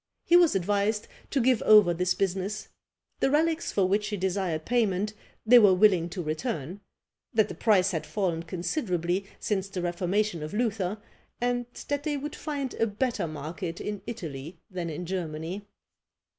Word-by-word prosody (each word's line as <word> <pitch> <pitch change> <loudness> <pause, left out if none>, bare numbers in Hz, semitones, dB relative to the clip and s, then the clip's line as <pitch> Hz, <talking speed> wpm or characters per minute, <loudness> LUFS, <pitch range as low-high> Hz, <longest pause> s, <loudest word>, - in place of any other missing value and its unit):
He 345 - +5
was 345 - +6
advised 205 +3 0 0.2
to 280 - +1
give 250 -2 +3
over 210 -5 +7
this 180 +2 0
business; 195 +2 -2 0.5
the - - +3
relics 320 +3 +1
for 195 - +2
which 205 +2 +1
he 210 -1 -3
desired 185 -4 -1
payment 215 -4 +1 0.3
they 245 +2 +8
were 200 -4 +6
willing 185 -4 +4
to 180 0 -4
return; 160 - -3 0.5
that 220 -2 +4
the - - -5
price 195 +1 +3
had 160 -4 -3
fallen 180 -6 -1
considerably 180 - -2
since 195 -2 -1
the 185 -3 -4
reformation 180 +1 0
of 155 +5 -5
Luther; 210 -4 0 0.4
and 245 0 0 0.2
that 285 0 -1
they 295 0 -1
would 295 +2 -5
find 285 -4 -4
a 225 - +1
better 215 -3 -1
market 160 +3 -5
in 210 -1 -4
Italy 160 - -6
than 175 -2 -3
in 160 +3 -5
Germany! 175 +2 -4
195 Hz, 160 wpm, -28 LUFS, 175-225 Hz, 0.5 s, they